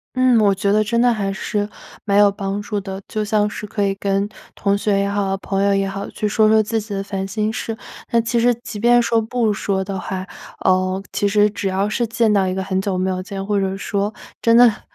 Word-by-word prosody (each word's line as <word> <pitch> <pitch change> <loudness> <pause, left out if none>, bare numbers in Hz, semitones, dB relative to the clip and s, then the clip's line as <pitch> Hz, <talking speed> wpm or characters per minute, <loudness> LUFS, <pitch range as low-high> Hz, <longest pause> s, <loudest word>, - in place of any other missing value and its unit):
嗯， 255 -2 +4
我 200 -2 +4
觉 200 +1 0
得 215 +1 +3
真 235 +2 0
的 245 0 +4
还 200 -3 -2
是 205 +2 -2 0.3
蛮 200 -1 +1
有 205 -1 +6
帮 195 0 -3
助 205 -1 -2
的， 195 -1 -6
就 215 - -2
像 210 0 +1
是 210 0 -6
可 205 0 -1
以 195 - +1
跟 200 0 0 0.3
同 200 -1 +1
学 200 -1 +1
也 200 - +1
好， 200 -1 -1
朋 195 0 -2
友 200 - +3
也 195 0 +1
好， 195 +1 -5
去 210 - -2
说 215 +1 +3
说 220 0 +5
自 220 +1 -1
己 205 -1 -6
的 195 - -2
烦 195 -1 -4
心 215 +2 -1
事， 225 -2 -4 0.3
那 235 - +3
其 230 +1 0
实 245 +1 +4
即 230 -2 -8
便 240 +2 +5
说 230 -1 +2
不 225 -1 0
说 195 -1 -1
的 190 0 -4
话， 185 0 -4 0.4
呃， 185 +1 +2
其 205 - +1
实 205 +1 +4
只 200 -1 -3
要 190 +1 0
是 235 +3 -1
见 225 -1 +2
到 195 -2 +3
一 185 - -1
个 190 - -2
很 190 0 -1
久 195 -1 -2
没 185 +1 0
有 185 0 -2
见， 195 +1 -6
或 205 0 +1
者 195 0 -1
说 200 +1 -2 0.3
真 230 0 +5
的 245 0 +9
很 220 - -1
205 Hz, 270 characters per minute, -20 LUFS, 195-220 Hz, 0.4 s, 的